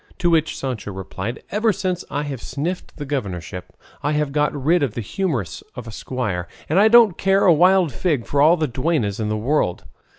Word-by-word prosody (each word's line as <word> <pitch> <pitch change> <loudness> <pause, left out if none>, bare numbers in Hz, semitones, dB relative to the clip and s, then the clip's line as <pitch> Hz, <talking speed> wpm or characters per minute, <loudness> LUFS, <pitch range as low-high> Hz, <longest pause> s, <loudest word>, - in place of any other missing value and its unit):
To 175 -2 +1
which 160 -1 +1
Sancho 125 -6 -4
replied, 95 +5 -6
"Ever 215 +3 +2
since 185 -2 -2
I 145 - -2
have 140 -5 -5
sniffed 175 +6 -4
the 145 - -5
governorship 95 - -5 0.2
I 145 +2 0
have 150 -1 0
got 150 +1 +1
rid 155 +5 +1
of 130 -7 -1
the 120 - -2
humours 120 - -3
of 125 -2 -7
a 115 - -8
squire, 105 -7 -3 0.2
and 165 +6 +2
I 210 - +6
don't 225 -5 +6
care 195 0 +3
a 180 - +7
wild 180 0 +4
fig 145 -2 -1
for 140 - +1
all 160 +4 +6
the 155 -2 0
duennas 125 - -1
in 105 -1 -1
the 110 - -1
world." 110 -6 0
145 Hz, 205 wpm, -21 LUFS, 115-175 Hz, 0.2 s, a